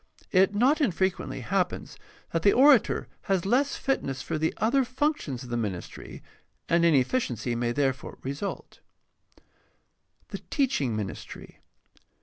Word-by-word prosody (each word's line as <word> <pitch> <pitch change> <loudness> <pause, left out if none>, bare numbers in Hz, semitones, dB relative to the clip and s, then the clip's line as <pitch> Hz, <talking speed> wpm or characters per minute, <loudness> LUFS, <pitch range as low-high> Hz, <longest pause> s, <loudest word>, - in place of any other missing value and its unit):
It 190 +2 +4
not 270 +8 +3
infrequently 190 - -1
happens 185 -2 -2 0.4
that 165 - 0
the 200 - +5
orator 270 -2 +5 0.2
has 190 -2 +1
less 265 +7 +2
fitness 135 - -2
for 160 -2 -3
the 160 +1 +1
other 250 +6 +2
functions 255 - -2
of 125 - -10
the 120 - 0
ministry, 100 -6 -6 0.4
and 170 0 +3
inefficiency 130 - +1
may 120 0 -1
there 135 +1 +1
fore 130 - -11
result. 140 +9 -5 1.5
The - - -5
teaching 240 - 0
ministry. 105 -3 -7
175 Hz, 130 wpm, -27 LUFS, -, 1.5 s, the